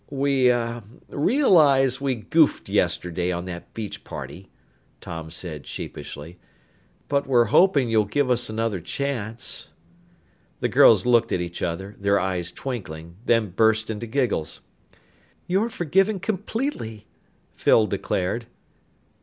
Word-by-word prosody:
"We 135 -2 +2
uh 120 -1 0 0.3
realize 145 - +4
we 135 -2 0
goofed 155 +7 +2
yesterday 90 0 0
on 85 0 -3
that 85 -1 -8
beach 110 -3 -6
party," 95 +1 -8 0.5
Tom 80 -1 -7
said 80 -3 -6
sheepishly. 80 +5 -8 0.7
"But 140 0 0
we're 120 -3 +4
hoping 155 -9 +5
you'll 110 -2 +3
give 130 +5 0
us 120 -1 +1
another 110 -3 -1
chance." 115 +3 -4 0.9
The - - 0
girls - - +6
looked 120 -2 +3
at - - +1
each 85 0 -5
other, 95 +5 -4
their 100 0 +2
eyes 90 -2 -2
twinkling, 85 -10 -7
then 115 -5 +2
burst 110 +3 +2
into 110 +2 -5
giggles. 115 - -1 0.8
"You're 195 +6 +1
forgiven 195 +2 +1
completely!" 190 - -3 0.5
Phyl 110 - +4
declared. 100 +2 -2
115 Hz, 120 wpm, -24 LUFS, 95-140 Hz, 0.9 s, girls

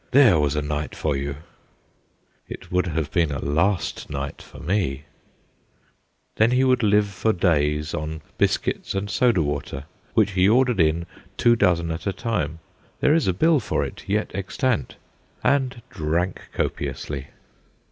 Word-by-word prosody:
There 120 - +6
was 75 0 +1
a 75 - 0
night 75 +1 -3
for 75 -3 -1
you! 70 +1 -3 0.6
' - - -41 0.3
It - - -9
would 90 0 +1
have 80 -2 -2
been 85 -4 +2
a 70 - -2
last 80 +8 0
night 70 +1 -5
for - - -14
me! 85 -8 -1 1.3
Then 110 +1 +5
he 125 +1 +3
would 130 -1 +3
live 105 -1 +4
for 100 +3 0
days 75 -5 +1
on 75 +1 -4 0.2
biscuits - - 0
and 100 +1 -2
soda 110 -4 +3
water, 70 -2 -3 0.3
which - - +4
he 95 0 +3
ordered 125 -2 +3
in 80 +1 +2 0.3
two 120 0 +5
dozen 85 -6 +2
at 80 +5 -4
a 100 - 0
time 100 - -2 0.4
there 145 - +4
is 160 -7 +2
a - - +4
bill 155 - +3
for - - -1
it - - -9
yet 105 +2 0
extant 110 +5 -1 0.5
and 130 -4 +1
drank 85 0 -2
copiously. 70 -2 -3
90 Hz, 155 wpm, -23 LUFS, 75-110 Hz, 1.3 s, There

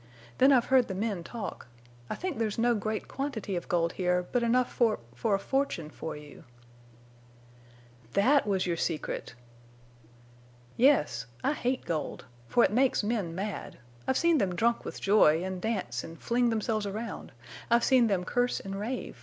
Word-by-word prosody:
Then 265 +2 +7
I've 250 -3 +5
heard 255 -2 +5
the 190 - -4
men 200 -3 -2
talk. 225 - -6 0.4
I - - -2
think 360 -8 -4
there's 215 -2 -1
no 240 +1 +3
great 215 0 -3
quantity 250 -8 -3
of 175 - -4
gold 170 -1 +1
here, 180 -1 0
but 245 - +2
enough 240 +2 +2
for—for 205 - 0
a - - +1
fortune 195 - -2
for 160 - -6
you." 150 +1 -13 1.7
"That—was—your—secret!" 190 - +1 1.4
"Yes. 150 - +3 0.2
I - - +2
hate 255 -2 -2
gold. 160 -3 -3 0.2
For 240 - +4
it - - +3
makes 255 -1 +3
men 205 -7 -1
mad. 200 +2 -5 0.3
I've 265 - +2
seen 335 -3 +3
them 185 -5 0
drunk 235 +5 +1
with - - -6
joy 175 -5 +4
and 190 -1 -4
dance 185 - -2
and 165 0 -10
fling 240 0 +1
themselves 220 -1 -1
around. 220 +4 -5 0.4
I've 235 0 +4
seen 255 -3 +5
them 195 -4 0
curse 245 +6 0
and 195 0 -6
rave. 240 +5 -4
215 Hz, 155 wpm, -29 LUFS, 180-245 Hz, 1.7 s, Then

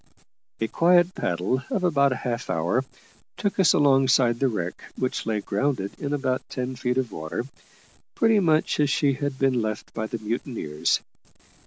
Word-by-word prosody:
A 110 - 0
quiet 175 +6 +4
paddle 90 - -1
of 195 - -1
about 140 -6 +3
half 125 -1 -3
an 90 - 0
hour 90 +11 +1 0.5
took 200 -1 -2
us 170 -4 +6
alongside 135 -4 +4
the 135 - +3
wreck, 90 -7 -4
which 130 -3 -2
lay 110 -2 0
grounded 100 -2 -1
in 140 - -3
about 130 -3 0
ten 130 0 -4
feet 125 0 -1
of 130 -4 -1
water, 80 +9 -4 0.7
pretty 225 -2 +4
much 160 -5 +2
as 145 -1 +3
she 140 -1 +2
had 140 0 -3
been 130 -3 +2
left 110 -1 -4
by 110 -1 -3
the 115 - -4
mutineers. 110 - -2
130 Hz, 165 wpm, -25 LUFS, 110-145 Hz, 0.7 s, us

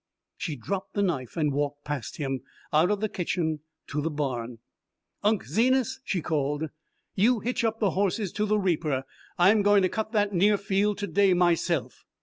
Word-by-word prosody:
She 155 -5 -4
dropped 190 - -5
the 200 - +2
knife 135 - -2
and 150 -3 +1
walked 145 0 -2
past 145 -5 -4
him, 135 -4 -2 0.3
out 160 +4 +4
of 205 -1 0
the 215 - +1
kitchen, 170 -5 -2 0.3
to 150 - -3
the 160 - -1
barn. 125 -6 -3 0.6
"Unc' 210 -1 +1
Zenas," 260 +2 +2
she 180 - -2
called, 150 -1 -1 0.4
"you 230 +5 +3
hitch 245 +2 -1
up 225 -1 0
the 205 -4 +2
horses 195 0 0
to 210 0 -1
the 215 +1 +2
reaper. 160 -8 0 0.3
I'm 200 +5 +5
going 205 -1 +5
to 185 - +3
cut 220 +2 -3
that 205 -1 +2
near 200 +3 +4
field 200 +1 0
to 205 0 -3
day 200 -2 +3
myself." 175 -3 +1
185 Hz, 180 wpm, -27 LUFS, 150-205 Hz, 0.6 s, I'm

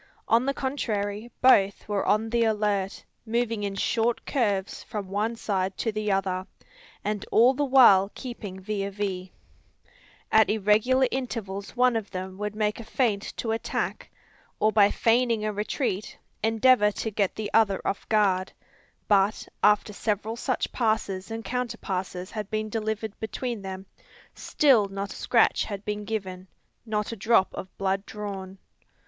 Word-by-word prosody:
On 235 +3 +3
the 275 - +2
contrary, 220 -5 -2
both 200 -6 +4
were 205 -2 0
on 220 +2 +1
the 235 0 +3
alert, 210 -3 0 0.2
moving 230 -1 -1
in 200 -1 -3
short 230 +3 0
curves 205 -8 -1
from 205 -3 -6
one 210 +4 -1
side 195 -4 -2
to 225 - -1
the 210 -1 -1
other, 190 -1 -1 0.6
and 210 -1 -2
all 240 +4 +6
the 290 +2 -1
while 235 -8 +6
keeping 215 -7 -7
vis 200 +1 -3
a - - -4
vis. 190 -2 -4 1.0
At 220 -1 +5
irregular 220 +5 +3
intervals 220 -7 -4
one 250 -1 +3
of 220 -3 -2
them 185 +1 -6
would 210 0 -3
make 210 0 0
a - - -6
feint 220 -3 0 0.2
to 225 - -2
attack; 225 - -3 0.5
or 215 - +3
by 205 -2 +5
feigning 230 -1 +2
a 215 - -1
retreat 210 0 -2 0.2
endeavour 225 -1 +4
to 220 - -3
get 200 -2 0
the 215 -1 -4
other 205 -4 +4
off 200 - -3
guard; 195 -4 +2 0.6
but, 205 +1 +2
after 210 0 +3
several 215 +2 -2
such 250 +2 -2
passes 215 -5 -1
and 225 0 -5
counter 250 -1 -2
passes 185 -1 -4
had 210 -2 -5
been 215 0 -2
delivered 220 -1 -3
between 230 0 -4
them, 190 0 -7 0.5
still 255 -9 +3
not 195 +1 -5
a - - -13
scratch 235 - +2
had 200 -1 -6
been 210 0 -3
given, 190 -4 -4 0.4
not 210 0 -1
a - - -4
drop 220 -2 +2
of 185 - -8
blood 195 0 0
drawn. 195 -2 -6
210 Hz, 155 wpm, -26 LUFS, 195-225 Hz, 1.0 s, all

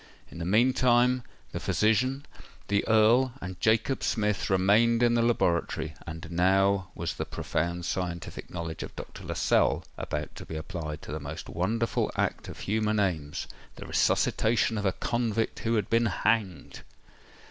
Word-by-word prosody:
In - - -9
the 85 - -3
meantime, 125 +4 +3 0.3
the - - -4
physician, 130 +6 +1 0.4
the 100 0 +2
Earl, 115 +4 +4
and 90 0 -7
Jacob 115 +4 +2
Smith 105 -3 0
remained 105 +5 +4
in 120 -1 +4
the 120 - +3
laboratory; 85 -8 0
and 80 0 -7
now 95 +2 +2
was 85 -1 -3
the - - -3
profound 85 +1 -3
scientific 90 -2 -4
knowledge 85 -2 -5
of - - -7
Dr. - - -9
Lascelles - - +1
about 75 0 -4
to - - -8
be 80 - -6
applied 80 -2 -5
to - - -8
the 75 - -3
most 75 +2 -7
wonderful 110 +6 0
act - - -1
of - - -9
human 110 +1 0
aims—the 80 -7 -4
resuscitation 110 0 +2
of 100 - 0
a - - +3
convict 115 -2 -1
who 115 +1 0
had 105 - 0
been 115 0 +2
hanged! 105 -6 -1
105 Hz, 150 wpm, -28 LUFS, 85-115 Hz, 0.4 s, Earl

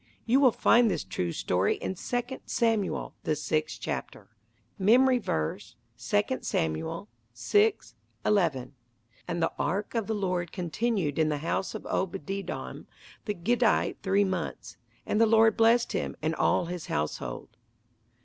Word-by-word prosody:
You 245 +4 +4
will 265 -3 +6
find 235 +1 +4
this - - -1
true 90 -2 -3
story 90 +3 +1
in 190 - -4
Second 245 +6 -3
Samuel, 225 -5 0
the 155 - 0
sixth 155 +1 -2
chapter. - - -5 0.5
Memory 250 +6 +5
Verse, 95 - -3 0.4
II 210 +5 +2
Samuel 80 - -2 0.3
6: 420 0 +1 0.3
11 165 -11 +1 0.5
"And 170 0 -1
the 165 - +1
ark 190 +7 -1
of 230 -4 -1
the 220 - -1
Lord 180 -4 -1
continued 180 -3 -1
in 155 -1 +3
the 150 - 0
house 190 - -1
of - - -6
Obededom 190 +1 -4 0.4
the 210 - -2
Gittite 230 +6 +1
three 200 +1 +2
months; 170 -10 -4 0.3
and 210 - +1
the 225 - +6
Lord 225 0 +5
blessed 230 +1 +4
him, - - -2
and 155 +1 -1
all 165 - +2
his 175 -1 -6
household." 75 -5 -3
190 Hz, 140 wpm, -28 LUFS, 155-225 Hz, 0.5 s, will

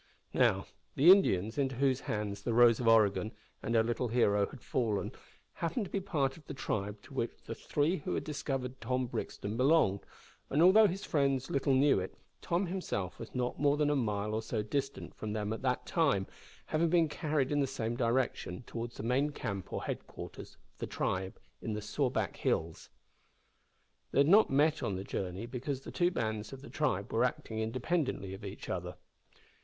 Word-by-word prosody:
Now, - - +3 0.3
the 160 +7 +8
Indians, 110 - +4
into 135 -2 0
whose 130 0 +2
hands 105 -4 -3
the 115 +2 -1
Rose 120 -2 +6
of 120 - -1
Oregon 110 -1 +4 0.3
and 115 - -1
our 110 - +5
little 120 +2 -1
hero 105 -4 +3
had 135 - -12
fallen, 110 -5 -1 0.4
happened 185 +7 -2
to - - -11
be 200 - 0
part 155 -9 -1
of 155 - -16
the 145 - -6
tribe 105 -5 -3
to - - -14
which - - -3
the - - -5
three 155 +6 0
who 145 - -3
had - - -2
discovered 135 -4 -4
Tom 125 +2 0
Brixton 110 -2 -4
belonged, 130 -7 +4 0.5
and 145 - +1
although 210 +4 +8
his 195 +1 -4
friends 135 -3 +1
little 140 0 +2
knew 140 -4 +4
it, 95 - -6 0.2
Tom 175 +3 0
himself 170 - -3
was 115 - -9
not 125 -1 -1
more 145 0 +3
than 150 -1 +2
a - - +2
mile 105 -4 -1
or 110 - 0
so 110 -1 -2
distant 135 +5 -3
from 105 -1 -5
them 105 0 -2
at 110 - -6
the 125 -1 +1
time, 140 - +2 0.4
having 165 +2 +1
been 170 -1 +4
carried 150 -3 -1
in 145 - +2
the 140 - +2
same 120 -3 -3
direction, 120 -4 -1
towards 115 0 -6
the - - -5
main 130 +5 +2
camp 100 - -5
or - - -3
headquarters - - -7 0.2
of - - -34
the - - -3
tribe 95 0 -2 0.2
in 110 - -3
the 105 - -2
Sawback 110 - -1
Hills. 80 0 -1 1.2
They 140 - +4
had 140 - +4
not 205 +6 +6
met 150 +3 +3
on 100 - -1
the 95 - -4
journey, 95 +1 -4
because 130 +3 -4
the - - -8
two 175 -1 +2
bands 110 - -3
of 135 0 -9
the - - -10
tribe - - -1
were - - +3
acting 110 - -2
independently 125 - -1
of 95 +2 -9
each 100 0 -7
other. 90 0 -4
125 Hz, 195 wpm, -32 LUFS, 105-145 Hz, 1.2 s, the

